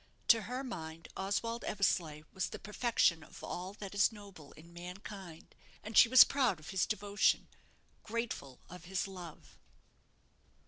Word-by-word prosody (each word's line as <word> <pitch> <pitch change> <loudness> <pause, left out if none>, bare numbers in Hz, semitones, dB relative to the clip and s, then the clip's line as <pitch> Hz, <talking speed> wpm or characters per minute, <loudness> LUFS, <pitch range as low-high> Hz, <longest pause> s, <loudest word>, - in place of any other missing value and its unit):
To 230 -1 +7
her 255 +2 -3
mind, 165 -9 -7
Oswald 225 +4 -2
Eversleigh 170 -6 0
was 190 - -2
the - - -6
perfection 210 -6 +1
of - - -13
all 185 +2 -5
that 200 -2 -8
is 200 +3 +4
noble 200 -9 -13
in 170 +2 -16
mankind, 180 0 -9 0.3
and 220 +1 -7
she 230 - +8
was 255 +1 +11
proud 255 - +1
of 155 - -9
his 190 -2 +1
devotion, 205 -1 +1 0.5
grateful 225 - -4
of 180 0 -11
his 190 +2 -2
love. 180 -4 -11
195 Hz, 145 wpm, -34 LUFS, 170-215 Hz, 0.5 s, was